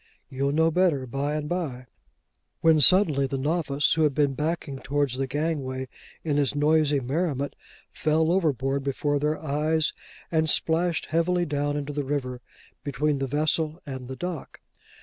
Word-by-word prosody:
you'll 135 +1 -1
know 160 +2 +3
better 160 -6 +2
by 140 +4 -2
and 150 -1 -3
by:' 150 -8 -3 0.8
when 160 -1 +5
suddenly 150 -4 +6
the 135 - -3
novice, 145 0 +1
who 160 - 0
had 150 -3 +2
been 145 -2 +2
backing 150 -1 -3
towards 140 -2 -1
the 135 0 -1
gangway 135 -2 -2 0.4
in 150 -3 0
his 145 -1 +1
noisy 150 -1 +3
merriment, 140 +1 -2 0.4
fell 160 +1 +1
overboard 140 -6 0
before 145 +1 -1
their 150 +2 0
eyes, 155 +1 0 0.4
and 160 -1 +2
splashed 165 +2 +1
heavily 175 +2 +1
down 145 -1 -1
into 145 0 -4
the 145 0 -2
river 130 -3 -3 0.4
between 150 0 -1
the 135 - -1
vessel 155 +3 0
and 130 -3 -7
the 130 - -6
dock. 175 0 -6
145 Hz, 155 wpm, -26 LUFS, 140-160 Hz, 0.8 s, suddenly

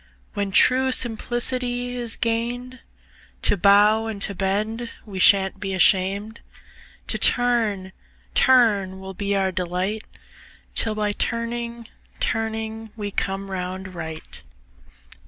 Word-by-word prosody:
When 200 -1 -2
true 260 +6 +4
simplicity 245 +1 +1
is 240 -2 +2
gain'd, 240 +2 -2 0.6
To - - +2
bow 205 +3 +4
and 220 -2 -5
to 200 - -4
bend 210 +5 -2 0.2
we 195 -3 -7
shan't 195 0 +4
be 195 -1 -3
asham'd, 195 +4 +2 0.7
To - - -3
turn, 225 -6 +2 0.4
turn 205 -7 +3
will 190 0 -8
be 200 +1 -2
our 190 -1 +1
delight 185 +4 -2 0.7
'Till 220 -1 -2
by 210 -1 0
turning, 235 +1 -3 0.3
turning 220 0 -3
we 205 -2 -5
come 195 0 -3
round 185 0 -5
right. 160 - -8
210 Hz, 115 wpm, -23 LUFS, 190-235 Hz, 0.7 s, true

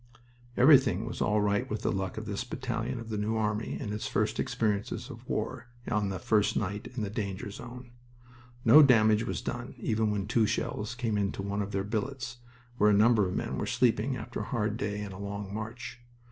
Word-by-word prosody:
Everything 125 - +6
was 115 - -5
all 105 -1 +2
right 100 0 +1
with 105 0 -3
the - - +1
luck 95 0 -3
of 110 - -4
this 100 +1 -3
battalion 125 -1 -3
of 115 -1 -8
the 105 -2 -2
New 110 +2 0
Army 105 0 -1
in 105 -6 -4
its 105 - -3
first - - 0
experience 105 -2 -1
of - - -12
war - - -3 0.2
on 105 -3 +1
the 95 - -3
first 110 -3 +2
night 100 +1 -2
in 110 - -1
the 100 - -2
danger 100 -1 -4
zone. 120 +3 -9 0.7
No 155 - +9
damage 110 -4 +5
was - - -3
done 120 +1 -5
even 110 -2 0
when 105 -2 -1
two 110 0 +2
shells 105 +2 -2
came 115 -4 -1
into 100 -1 -1
one 100 +1 -2
of 100 0 -4
their 95 -1 -1
billets, 120 +4 -3 0.4
where 105 - +6
a - - +5
number 105 -1 +5
of 90 - -3
men - - -2
were - - -2
sleeping 125 +1 +2
after 120 - -6
a - - -3
hard 110 -4 -1
day 105 -1 -3
and 100 -2 -7
a 95 - -9
long 100 0 -5
march. 110 +3 -6
110 Hz, 210 wpm, -29 LUFS, 105-120 Hz, 0.7 s, No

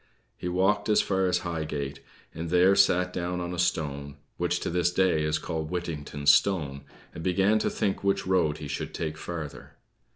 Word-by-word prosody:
He - - -6
walked 95 +5 +1
as 105 - +5
far 95 -1 +1
as 90 0 0
Highgate, 75 -4 -3 0.3
and 85 +1 -5
there 90 +3 +5
sat 90 -2 +3
down 90 0 -2
on 90 0 -4
a 90 - -5
stone, 70 -5 -1 0.2
which - - 0
to - - -2
this 90 0 +2
day 90 -3 +2
is 75 0 +1
called 80 0 -4
Whittington's 75 -5 +1
stone, 70 -9 +1 0.3
and 80 - -7
began 95 +4 +3
to - - 0
think 100 -1 -1
which 100 0 +1
road 85 -5 +2
he 75 - -7
should 70 - -4
take 80 -2 -3
farther. 80 -2 -7
85 Hz, 185 wpm, -27 LUFS, 75-90 Hz, 0.3 s, as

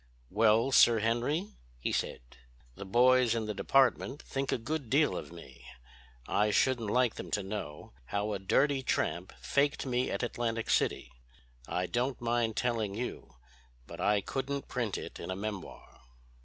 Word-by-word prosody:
"Well, 110 +4 +3
Sir 120 -3 +6
Henry," 120 - 0 0.2
he - - -2
said, - - -2 0.5
"the 100 - -8
boys 125 +3 +4
in 115 -1 -1
the 105 - -3
department 135 +4 +2
think 135 0 -3
a - - +1
good 140 +1 -4
deal 150 +4 +3
of - - -6
me. 85 -7 -13 0.6
I 105 +1 +2
shouldn't 120 0 +2
like 125 +1 +2
them - - -6
to 105 - -1
know 95 - -6
how 100 - -2
a 100 - -3
dirty 135 +8 +2
tramp 130 - -1
faked 140 - +1
me 125 -1 0
at - - -2
Atlantic 115 -1 -2
City. - - +1 0.6
I 90 - -1
don't 125 +6 -1
mind 120 -2 0
telling 115 -5 -1
you, 125 +3 -6 0.5
but 85 +5 -9
I 105 +1 +3
couldn't 140 +5 -3
print 120 -5 -2
it - - -8
in - - -7
a 95 - -2
memoir." 100 0 -7
115 Hz, 160 wpm, -31 LUFS, 105-130 Hz, 0.6 s, Sir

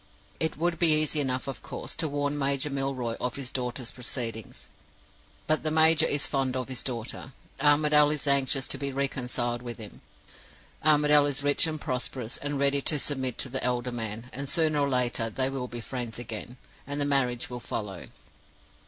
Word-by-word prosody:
It 160 -1 -1
would 170 +1 0
be 155 -3 +5
easy 155 0 +1
enough, 130 -1 -1
of 135 - -5
course, - - -6
to 165 - +1
warn 145 0 -1
Major 140 0 0
Milroy 135 -4 -1
of 125 0 -1
his 135 -2 -4
daughter's 125 -1 -2
proceedings. 115 -3 -4 0.8
But 155 0 +1
the 155 - -1
major 160 0 +5
is 145 0 +2
fond 135 -2 0
of 130 0 -4
his 130 - -3
daughter; 125 +1 -5 0.3
Armadale 150 +1 +5
is 150 -1 -1
anxious 135 -1 +2
to - - -1
be 140 -1 -2
reconciled 125 -3 -1
with 120 -2 -6
him; 110 -2 -10 0.8
Armadale 150 -1 +6
is 140 -1 -1
rich 145 +3 +3
and 155 -1 -2
prosperous, 125 -2 -2
and 145 0 -2
ready 140 0 +2
to 150 - +1
submit 130 -3 -1
to 135 - +1
the 130 +1 -2
elder 125 0 0
man; 115 0 -5
and 140 +1 -4
sooner 155 -3 +2
or 140 -1 +2
later 120 -3 +1
they 130 +4 0
will 130 -2 -3
be 120 -1 -6
friends 120 -1 -5
again, 120 +1 -6 0.3
and 145 0 -3
the 145 - +1
marriage 125 -4 +1
will 125 - -4
follow. 105 -5 -5
135 Hz, 185 wpm, -28 LUFS, 125-145 Hz, 0.8 s, Armadale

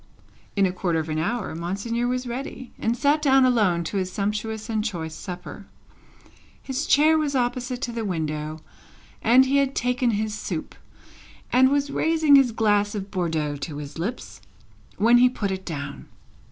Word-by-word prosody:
In 200 -1 +3
a 185 - +1
quarter 180 -2 -1
of 160 0 -2
an 155 0 -1
hour 215 +4 -2
Monseigneur 200 +8 -2
was 250 +1 -1
ready, 255 0 -6
and 230 +2 0
sat 290 +3 +2
down 270 -2 +5
alone 205 -9 +2
to 185 +5 -3
his 185 -1 -2
sumptuous 210 +2 -3
and 220 -2 -1
choice 165 -7 -4
supper. 180 +3 -8 0.9
His 270 +3 -3
chair 310 +2 +5
was 290 -2 -1
opposite 250 0 -1
to 240 - -2
the 230 -1 -4
window, 155 -4 -3 0.6
and 250 +4 +6
he 275 +2 +2
had 275 -1 +1
taken 250 0 +1
his 215 -1 -1
soup, 215 - -5 0.8
and 260 +1 +6
was 285 0 0
raising 315 -2 +4
his 270 -3 +5
glass 205 -2 +1
of 195 -1 -5
Bordeaux 160 -6 -1
to 145 +1 -6
his 145 +2 -8
lips, 220 +9 -5 0.6
when 235 +4 +5
he 250 +1 +6
put 210 -6 -3
it 190 0 -5
down. 140 -4 -6
220 Hz, 170 wpm, -24 LUFS, 180-255 Hz, 0.9 s, and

